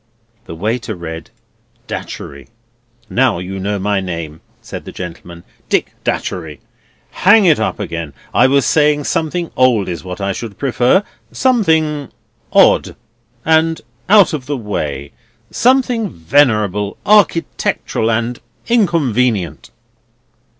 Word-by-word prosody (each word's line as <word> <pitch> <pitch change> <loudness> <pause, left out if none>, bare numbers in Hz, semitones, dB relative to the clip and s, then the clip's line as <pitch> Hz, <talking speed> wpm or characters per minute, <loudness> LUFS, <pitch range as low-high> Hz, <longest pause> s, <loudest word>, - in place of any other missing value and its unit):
The 80 - -8
waiter 110 +4 -2
read: 80 -2 -7 0.6
"Datchery." 70 -1 -7 0.6
"Now 125 -5 +2
you 95 +2 -5
know 100 +2 -2
my 100 +1 0
name," 85 -4 -5 0.2
said - - -8
the - - -8
gentleman; 85 -1 -9 0.3
"Dick - - 0
Datchery. 80 -5 -3 0.5
Hang 205 +2 +5
it 160 -4 +4
up - - -1
again. 85 -4 -5 0.2
I 125 - +5
was 140 -1 +3
saying 150 +2 +3
something 165 +4 -2
old 120 -6 +3
is 85 -3 -5
what 90 0 -7
I 100 0 -1
should 110 0 -7
prefer, 130 +7 +2 0.3
something 160 - +1 0.4
odd - - +4 0.5
and 160 0 +3 0.3
out 205 -4 +6
of 135 -4 -4
the 145 -1 -2
way; 75 - -4 0.4
something 245 -4 +2
venerable, 105 - +1
architectural, 185 - +1
and 115 +2 -1 0.3
inconvenient." 125 - +1
120 Hz, 115 wpm, -16 LUFS, -, 0.6 s, out